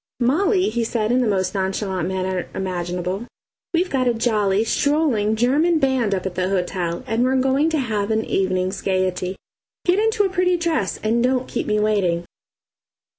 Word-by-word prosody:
"Molly," 365 - +2
he 235 +1 -1
said 225 -1 -1
in 255 +1 +3
the 245 - +1
most 190 -3 0
nonchalant 190 -2 -2
manner 185 -1 -2
imaginable, 180 +2 -3 0.4
"we've 355 +2 0
got 255 -2 +1
a 240 - +2
jolly, 215 -3 +1
strolling, 255 -5 +1
German 290 +9 +2
band 260 -8 +1
up 185 - -4
at 190 - -3
the 185 +1 -1
hotel; 180 -2 -2
and 225 +2 0
we're 260 +1 +2
going 265 +4 +2
to 320 - 0
have 215 -6 -1
an 220 0 0
evening's 185 0 -1
gaiety. 185 -1 -1 0.5
Get 360 +2 +3
into 440 -1 +2
a 390 - +1
pretty 360 -1 +2
dress, 330 - -1
and 225 +2 +1
don't 255 0 +1
keep - - -3
me 210 0 +1
waiting." 190 -5 +1
220 Hz, 175 wpm, -21 LUFS, 190-265 Hz, 0.5 s, in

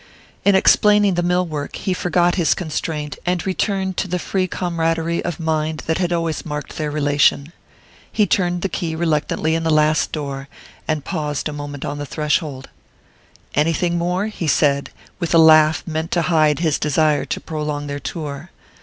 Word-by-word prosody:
In 200 -1 +4
explaining 205 +1 +5
the 175 - 0
mill 180 +1 +1
work 150 -3 -5
he 190 - -2
forgot 175 -1 +1
his 170 -4 +2
constraint 155 -2 -4
and 180 -1 -1
returned 190 -1 -1
to - - -1
the 180 0 -1
free 185 +1 -1
comradery 165 -2 -1
of 175 -2 -4
mind 160 -1 -1
that 160 +2 0
had 175 -2 0
always 165 -2 -1
marked 150 -2 -6
their 155 -1 -2
relation. 145 +1 +2 0.6
He 210 - +2
turned 175 -2 0
the - - +2
key 165 -2 -3
reluctantly 160 -1 0
in 165 - 0
the 165 - -1
last 155 0 +2
door, 140 -2 -5 0.4
and 155 -3 -1
paused 150 -1 -2
a 150 - -5
moment 145 -1 -6
on 145 0 -4
the 145 - -5
threshold. 150 -2 -2 0.9
"Anything 165 +3 +1
more?" 180 +3 0
he 210 -6 -4
said, 140 -1 +2 0.3
with 170 -2 0
a - - +7
laugh 155 -1 +6
meant 160 0 -3
to 170 - +2
hide 155 -2 +3
his 160 -3 0
desire 150 0 +2
to - - -3
prolong 150 -2 -4
their 145 0 -4
tour. 150 +1 -6
160 Hz, 175 wpm, -20 LUFS, 150-175 Hz, 0.9 s, a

